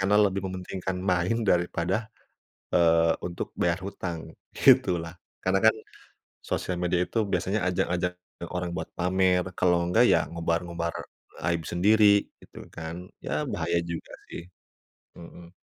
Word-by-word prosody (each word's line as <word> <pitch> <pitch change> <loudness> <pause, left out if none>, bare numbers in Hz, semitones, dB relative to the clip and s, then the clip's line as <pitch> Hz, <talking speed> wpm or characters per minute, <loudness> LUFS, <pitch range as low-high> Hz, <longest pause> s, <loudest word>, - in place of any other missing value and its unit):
karena 100 +2 +3
lebih 100 0 -2
mementingkan 95 0 -4
main 95 +5 +1
daripada, 90 +4 0 0.6
eee, 85 -1 +4
untuk 85 -1 -5
bayar 85 0 +2
hutang, 85 -4 -5 0.2
gitu 130 -9 +5
lah. 85 0 -7 0.3
Karena 95 +1 +3
kan, 110 - +6 0.7
sosial 90 - -2
media 90 0 +1
itu 115 -2 0
biasanya 95 +3 0
ajang-ajang 90 0 0 0.4
orang 90 -1 -2
buat - - -4
pamer 90 0 +2
kalau 90 -1 +3
enggak 115 +7 +4
ya - - +3
ngobar-ngobar 85 0 -2 0.6
aib 85 -1 0
sendiri 100 +3 +4 0.2
gitu - - -12
kan, 85 +2 -7 0.2
ya - - -1
bahaya 85 +1 0
juga 85 -1 -6 0.2
sih, - - -7 0.7
mhm. 85 0 -12
90 Hz, 130 wpm, -27 LUFS, 85-95 Hz, 0.7 s, kan